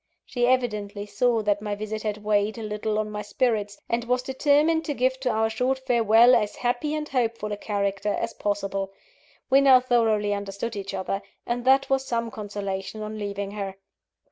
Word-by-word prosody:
She 245 -1 0
evidently 210 -5 0
saw 230 +1 +1
that 205 0 +1
my 210 -1 -3
visit 215 +1 -4
had 210 -1 -3
weighed 210 +1 +1
a 225 - -5
little 210 0 -2
on 215 0 -2
my 210 0 -4
spirits, 210 -3 -1
and 235 0 0
was 250 +1 0
determined 295 +5 +2
to 290 - -2
give 260 +1 +1
to 260 -1 -1
our 220 -1 +2
short 250 +4 0
farewell 240 -2 +5
as 210 -3 +2
happy 245 +5 -1
and 305 0 -3
hopeful 230 -5 -1
a - - -1
character 200 -1 -1
as - - -3
possible. 195 -1 -2 0.6
We 270 +1 +7
now 265 -2 +7
thoroughly 225 -5 +2
understood 200 +3 -4
each 195 -1 -5
other; 195 +1 -2 0.2
and 240 +1 -2
that 270 +1 +5
was 270 0 +1
some 230 -3 -2
consolation 205 0 -5
on 215 0 -6
leaving 200 -1 -4
her. 200 -2 -5
220 Hz, 185 wpm, -25 LUFS, 205-250 Hz, 0.6 s, We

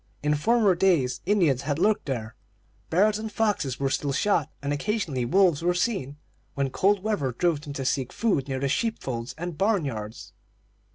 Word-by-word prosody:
In 150 0 +2
former 215 +6 +3
days 165 -10 +2
Indians 170 -11 +3
had 145 0 -2
lurked 205 +2 +1
there; 115 -4 -3 0.6
bears 205 +5 +3
and 220 0 -5
foxes 205 - 0
were 135 -1 0
still 140 0 -1
shot, 160 -2 +1
and 140 +1 -2
occasionally 150 - -1
wolves 180 +1 +3
were 175 +1 +1
seen, 180 - -1 0.4
when 140 -1 -1
cold 195 +4 +2
weather 205 -12 0
drove 165 +3 0
them 145 -1 -7
to 135 -2 -4
seek 130 -1 -1
food 195 - 0
near 135 -1 -2
the 140 - 0
sheep 225 - 0
folds 120 -2 -4
and 175 -1 -6
barn 200 -4 +2
yards. 110 -4 -6
150 Hz, 180 wpm, -26 LUFS, 135-200 Hz, 0.6 s, former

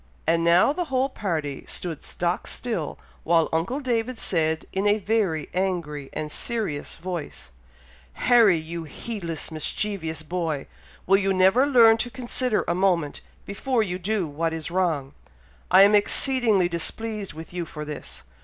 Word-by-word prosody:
And 165 +1 +2
now 170 +10 +5
the 355 +2 -2
whole 265 -2 0
party 160 - -3
stood 165 -4 -3
stock 175 0 -2
still, 220 - -3 0.3
while 165 0 +3
uncle 175 - 0
David 245 -2 -1
said 160 -5 0
in 195 +2 0
a 205 +1 +4
very 200 -7 0
angry 170 -7 -2
and 150 -1 -4
serious 215 -12 -3
voice, 170 - -6 0.6
"Harry! 225 - +5
you 165 +1 -6
heedless, 170 -2 -5
mischievous 160 0 -2
boy! 160 -3 -3 0.4
will 195 +1 +5
you 195 -1 +1
never 190 +9 +4
learn 230 -5 +6
to 245 - -2
consider 250 -2 -1
a - - +1
moment 175 -5 +1 0.2
before 230 +4 0
you 180 -3 -4
do 200 0 -1
what 160 +3 -2
is 160 0 -5
wrong? 165 -7 0 0.6
I 190 +2 +8
am 205 +1 +5
exceedingly 215 -2 +3
displeased 205 +5 -4
with 160 +2 -10
you 175 -2 -3
for 150 0 -7
this! 150 -1 -8
185 Hz, 150 wpm, -25 LUFS, 160-220 Hz, 0.6 s, I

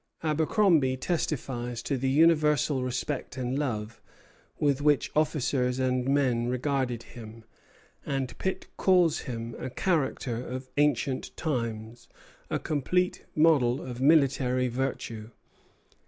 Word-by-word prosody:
Abercromby 155 -3 +2
testifies 125 -6 -3
to 140 - -1
the 130 +1 -1
universal 150 -2 +3
respect 130 +1 -3
and 130 +2 -2
love 115 -6 -3 0.6
with 145 -2 +1
which 145 -1 +2
officers 140 -4 +1
and 130 0 0
men 130 -4 +2
regarded 125 -2 -1
him, 115 -1 -11 0.6
and 135 -3 -3
Pitt 190 0 -2
calls 180 -4 +3
him 115 -1 -5
"a 130 - -4
character 135 -5 -1
of 130 +1 -7
ancient 140 -2 0
times; 115 -6 -3 0.4
a - - 0
complete 180 +5 -1
model 145 -6 +4
of 125 -1 -7
military 135 -4 +3
virtue." 115 -3 -4
130 Hz, 110 wpm, -28 LUFS, 125-150 Hz, 0.6 s, model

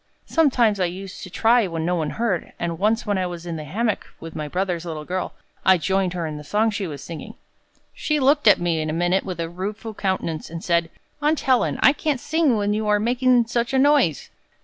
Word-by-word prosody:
Sometimes 245 -10 +2
I 185 - +2
used 185 +2 -7
to 185 - -8
try 230 +3 +3
when 165 -2 -3
no 175 - +1
one 160 -4 -1
heard, 220 -5 -2
and 170 -1 -3
once 220 +3 +1
when 205 -3 0
I 185 - 0
was 175 -1 -7
in 170 -1 -4
the 155 -1 -6
hammock 215 - -1
with 165 0 -9
my 150 -1 -4
brother's 180 +1 -2
little 160 -3 -6
girl, 185 +2 -3 0.3
I 190 -1 +6
joined 190 +2 0
her 175 -2 -3
in 155 -1 -5
the 150 - -8
song 215 +8 +1
she 205 -2 -3
was 145 -4 -7
singing. 165 -2 -8 0.6
She 305 -1 -1
looked 280 -1 +3
at 205 - +8
me 170 -2 0
in 155 - -2
a - - -2
minute 175 +3 +1
with 180 -3 -6
a 165 - -1
rueful 205 +6 -5
countenance, 185 -6 -2
and 165 +1 -7
said, 170 -1 +1 0.3
'Aunt 300 +1 +1
Helen, 260 -2 +2
I 275 - +7
can't 295 -3 -1
sing 305 -4 +1
when 205 0 0
you 215 0 -1
are 210 0 +3
making 245 +2 +3
such 235 +2 -1
a - - +4
noise!'" 270 - +3
190 Hz, 230 wpm, -23 LUFS, 170-235 Hz, 0.6 s, at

